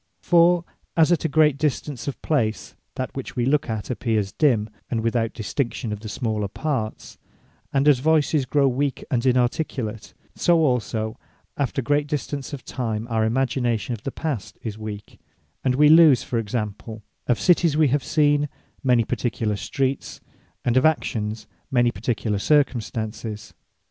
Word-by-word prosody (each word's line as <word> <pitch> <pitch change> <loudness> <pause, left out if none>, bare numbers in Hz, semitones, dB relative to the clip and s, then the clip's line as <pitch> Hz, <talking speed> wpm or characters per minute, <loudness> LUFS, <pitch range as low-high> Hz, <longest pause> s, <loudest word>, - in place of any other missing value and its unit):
For 175 0 +4 0.3
as 165 +1 +5
at 170 -1 +2
a 155 -1 +4
distance 140 -2 -2
of 140 - -4
place, 115 -9 -1 0.2
that 130 - -4
which 135 - -6
wee 120 -2 0
look 140 0 +1
at, 110 +1 -3
appears 110 -5 -1
dimme, 120 -9 +2 0.2
and 115 - -1
without 115 0 0
distinction 115 0 -2
of 105 - -5
the 110 0 -8
smaller 110 -2 -2
parts; 120 -1 -4 0.5
and 140 +1 +2
as 145 -4 +6
Voyces 150 -1 +2
grow 140 -1 +3
weak, 135 +1 -1
and 120 -2 +1
inarticulate: 125 -3 -1 0.2
so 170 -2 +3
also 110 -4 -1 0.4
after 135 -1 -1
great 145 +2 +1
distance 145 -1 -4
of 140 -4 -7
time, 110 -3 -3
our 110 -1 +2
imagination 120 -1 0
of 110 - -6
the 135 - -4
Past 140 -11 -4
is 110 -3 -4
weak; 105 -1 -8 0.4
and 130 -1 +2
wee 150 +2 +6
lose( 155 -4 +7
for 120 - -2
example) 110 0 -4 0.2
of 120 -4 +2
Cities 165 - +3
wee 155 -3 +4
have 140 +2 +1
seen, 145 -1 +2 0.3
many 125 -3 +4
particular 110 -3 -1
Streets; 135 +5 -2 0.5
and 120 +1 +2
of 130 - +4
Actions, 110 -8 0 0.2
many 120 -2 +3
particular 105 0 -2
Circumstances. 115 -5 -1
125 Hz, 155 wpm, -23 LUFS, 110-145 Hz, 0.5 s, lose